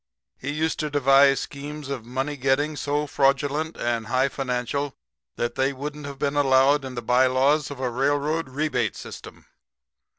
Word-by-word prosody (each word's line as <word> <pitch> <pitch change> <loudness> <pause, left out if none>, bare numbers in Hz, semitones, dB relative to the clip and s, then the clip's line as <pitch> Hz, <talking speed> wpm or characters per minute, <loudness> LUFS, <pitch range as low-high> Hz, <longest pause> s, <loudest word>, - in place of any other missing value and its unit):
He 140 - -6
used 160 +2 -1
to 150 - -1
devise 140 -1 +5
schemes 145 +1 -7
of 130 -5 -4
money 135 +4 -2
getting 140 +3 +1
so 145 +1 -1
fraudulent 145 +3 +1
and 115 -2 -1
high 130 +3 +2
financial 135 +2 -2 0.4
that 120 0 -2
they 135 +2 0
wouldn't 145 +2 -6
have 140 -1 -7
been 140 +1 -1
allowed 140 0 +4
in 130 -1 -7
the 120 - -5
bylaws 130 +5 +3
of 140 -2 -8
a 130 - -1
railroad 145 +5 0
rebate 130 -6 -1
system. - - -10
140 Hz, 160 wpm, -24 LUFS, 130-145 Hz, 0.4 s, devise